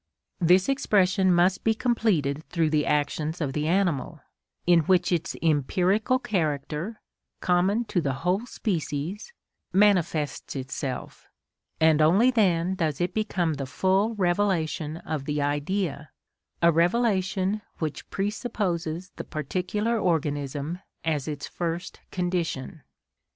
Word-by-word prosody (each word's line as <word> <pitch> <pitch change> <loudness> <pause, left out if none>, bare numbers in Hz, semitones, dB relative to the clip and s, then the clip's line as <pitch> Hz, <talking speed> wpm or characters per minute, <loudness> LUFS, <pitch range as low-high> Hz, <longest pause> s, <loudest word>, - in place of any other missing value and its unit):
This 180 +2 +4
expression 195 -8 +3
must 175 +1 +3
be 225 0 +2
completed 185 - +1
through 165 -3 +1
the 150 -1 +1
actions 150 +2 0
of 145 -5 -2
the 150 +1 -1
animal, 175 -7 0 0.5
in 175 -1 +6
which 180 0 +3
its 175 +1 -1
empirical 180 - +2
character, 175 - -2 0.4
common 190 +6 +2
to 185 -5 0
the 140 -4 -1
whole 195 +7 +1
species, 180 - -3 0.4
manifests 180 -9 +2
itself, 130 0 -5 0.5
and 160 -1 +4
only 195 +11 +5
then 185 -6 +2
does 160 -6 -1
it 175 - -1
become 185 -7 0
the 135 -2 -4
full 190 - +1
revelation 175 -5 0
of 155 -4 -4
the 150 0 -1
Idea, 145 +1 -1 0.5
a 170 - +7
revelation 190 +2 +1 0.2
which 155 -5 -4
presupposes 190 -5 -2
the - - -4
particular 185 - -2
organism 150 -2 -1 0.3
as 150 -3 0
its 145 -2 -4
first 170 +1 -4
condition. 170 -5 -2
175 Hz, 120 wpm, -26 LUFS, 155-195 Hz, 0.5 s, a